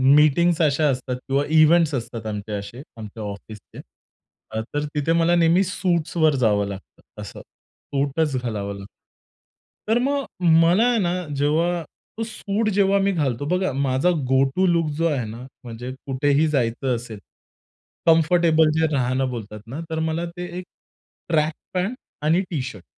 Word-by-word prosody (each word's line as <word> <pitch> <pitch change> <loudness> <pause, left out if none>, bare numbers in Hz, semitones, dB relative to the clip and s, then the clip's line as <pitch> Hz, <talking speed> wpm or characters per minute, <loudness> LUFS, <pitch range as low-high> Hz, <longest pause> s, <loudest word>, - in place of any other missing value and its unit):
Meetings 165 +3 +4
अशा 150 0 +3
असतात 130 -1 -2
किंवा 135 +1 +1 0.2
इव्हेंट्स 160 -1 +5
असतात 115 -2 -5
आमचे 105 0 -5
असे, 105 +6 -6 0.2
आमच्या 110 0 -8
ऑफिसचे, 105 +1 -9 0.7
अ, 110 - -3
तर 145 0 -1
तिथे 150 +3 0
मला 170 +1 +3
नेहमी 170 +3 +4
सूट्सवर 170 -4 +1
जावं 100 -2 +2
लागतं 100 -1 -11
असं. - - -9
सूटच 140 +1 -3
घालावं 100 -4 -3
लागतं. 100 0 -10 1.0
तर 225 - +4
मग 275 +2 0 0.4
मला 180 +7 +4
आहे 240 -2 +2
ना 175 -2 0 0.2
जेव्हा 165 +5 +1 0.4
तो 225 - -2
सूट 215 0 -2
जेव्हा 200 0 +3
मी 195 0 +2
घालतो 145 -6 -1
बघा 185 -5 0
माझा 135 +4 +1 0.2
गो-टू 135 +7 +2
लूक 165 -3 +2
जो 165 - +1
आहे 135 -7 -1
ना, 115 +4 -8 0.2
म्हणजे 120 +2 -7
कुठेही 145 +3 +2
जायचं 125 -2 0
असेल, 115 -3 -8 0.9
कम्फरटेबल 160 -1 +4
जे 160 - +3
राहणं 130 0 0
बोलतात 105 -3 -7
ना 135 +7 -6
तर 160 0 -2
मला 160 +1 -1
ते 180 - -4
एक 180 - -6 0.6
ट्रक 155 -1 +2 0.2
पॅन्ट 190 +7 -1 0.3
आणि 165 +5 +3
टी-शर्ट. 130 - -5
150 Hz, 150 wpm, -22 LUFS, 125-170 Hz, 1.0 s, इव्हेंट्स